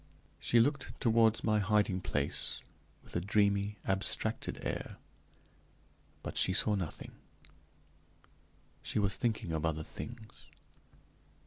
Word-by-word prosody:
She 120 Hz, -, +4 dB
looked 140 Hz, +3 st, +1 dB
toward 115 Hz, -2 st, +4 dB
my 110 Hz, -1 st, +3 dB
hiding 100 Hz, -2 st, +2 dB
place 70 Hz, -5 st, -1 dB, 0.4 s
with -, -, -15 dB
a 85 Hz, -, +1 dB
dreamy, 100 Hz, +1 st, +2 dB
abstracted 95 Hz, 0 st, 0 dB
air, -, -, -3 dB, 1.3 s
but -, -, -5 dB
she 95 Hz, -, +4 dB
saw 105 Hz, +2 st, +4 dB
nothing; 95 Hz, -6 st, -3 dB, 1.7 s
she -, -, -2 dB
was 100 Hz, -2 st, +2 dB
thinking 110 Hz, -7 st, -1 dB
of 80 Hz, -1 st, -1 dB
other 80 Hz, -1 st, 0 dB
things. 110 Hz, +6 st, -9 dB
100 Hz, 110 wpm, -33 LUFS, 95-110 Hz, 1.7 s, She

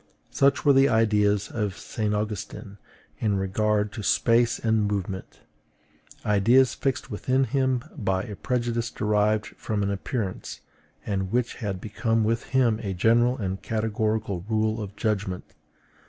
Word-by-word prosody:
Such 135 Hz, -1 st, +2 dB
were 140 Hz, -, +7 dB
the 135 Hz, +1 st, +5 dB
ideas 105 Hz, -2 st, +2 dB
of 105 Hz, -4 st, -2 dB
St. 105 Hz, -2 st, -3 dB
Augustine 105 Hz, -1 st, -4 dB, 0.4 s
in 105 Hz, -3 st, +1 dB
regard 105 Hz, +2 st, 0 dB
to 110 Hz, -, -6 dB
space 115 Hz, +3 st, +3 dB
and 110 Hz, -2 st, +1 dB
movement, 95 Hz, -2 st, -4 dB, 0.8 s
ideas 115 Hz, +5 st, +4 dB
fixed 135 Hz, -1 st, -2 dB
within 130 Hz, +6 st, +1 dB
him 130 Hz, -2 st, 0 dB
by 95 Hz, -8 st, -1 dB
a 105 Hz, -, -7 dB
prejudice 120 Hz, 0 st, -1 dB
derived 105 Hz, 0 st, +1 dB
from 105 Hz, -2 st, -3 dB
an 100 Hz, -, 0 dB
appearance, 100 Hz, 0 st, -4 dB, 0.4 s
and 95 Hz, -2 st, -2 dB
which 125 Hz, 0 st, 0 dB
had 100 Hz, -5 st, -3 dB
become 115 Hz, +2 st, 0 dB
with 115 Hz, +1 st, 0 dB
him 120 Hz, -5 st, +2 dB
a 100 Hz, -3 st, -3 dB
general 120 Hz, +6 st, +3 dB
and 95 Hz, -3 st, -3 dB
categorical 110 Hz, -3 st, -1 dB
rule 110 Hz, 0 st, +1 dB
of 100 Hz, -1 st, -7 dB
judgment. 100 Hz, -5 st, -2 dB
110 Hz, 140 wpm, -26 LUFS, 100-120 Hz, 0.8 s, were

